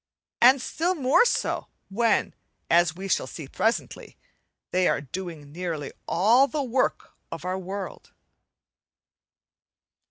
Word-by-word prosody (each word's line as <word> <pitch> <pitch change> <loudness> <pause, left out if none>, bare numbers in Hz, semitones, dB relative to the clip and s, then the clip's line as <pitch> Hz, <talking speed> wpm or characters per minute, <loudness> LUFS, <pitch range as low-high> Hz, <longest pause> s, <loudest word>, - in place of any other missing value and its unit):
and 260 +3 +7
still 350 +3 -1
more 280 - +4
so - - -1 0.2
when, 225 +2 +1 0.4
as 170 -1 +4
we 190 +2 -6
shall - - 0
see 155 -5 -8
presently, 225 - -2 0.5
they 185 0 +2
are - - +1
doing 155 0 -7
nearly 165 -3 -4 0.2
all 230 +10 +4
the 295 0 -2
work 255 0 -1 0.2
of - - -7
our 185 +1 -2
world. 190 +1 -7
190 Hz, 120 wpm, -26 LUFS, 170-250 Hz, 0.5 s, and